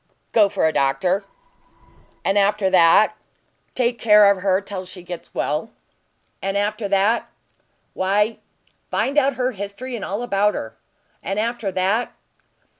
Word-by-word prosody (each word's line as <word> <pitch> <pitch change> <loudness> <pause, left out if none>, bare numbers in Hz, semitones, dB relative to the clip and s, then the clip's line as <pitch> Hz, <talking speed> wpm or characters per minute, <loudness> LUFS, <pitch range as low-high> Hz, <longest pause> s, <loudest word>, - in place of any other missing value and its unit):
"Go 210 -3 +4
for 195 -4 0
a 160 - +2
doctor." 145 +9 +1 1.0
"And 195 - +2
after 200 -1 +2
that?" 185 +4 +5 0.6
"Take 240 -2 0
care 210 -2 +6
of 195 -2 -2
her 190 -1 +2
till 195 -2 -6
she 185 -1 -12
gets 175 -1 -9
well." 155 +9 -2 0.7
"And 195 +1 -1
after 210 +1 -1
that?" 200 +4 +1 0.6
"Why 205 +4 0 0.5
find 275 - -1
out 280 -2 +3
her 255 0 0
history, 205 +4 -6
and 220 - -6
all 205 +5 -3
about 205 -3 +1
her." 110 - -6 0.5
"And 195 +3 -4
after 230 -2 -2
that?" 195 +6 0
200 Hz, 140 wpm, -21 LUFS, 190-220 Hz, 1.0 s, care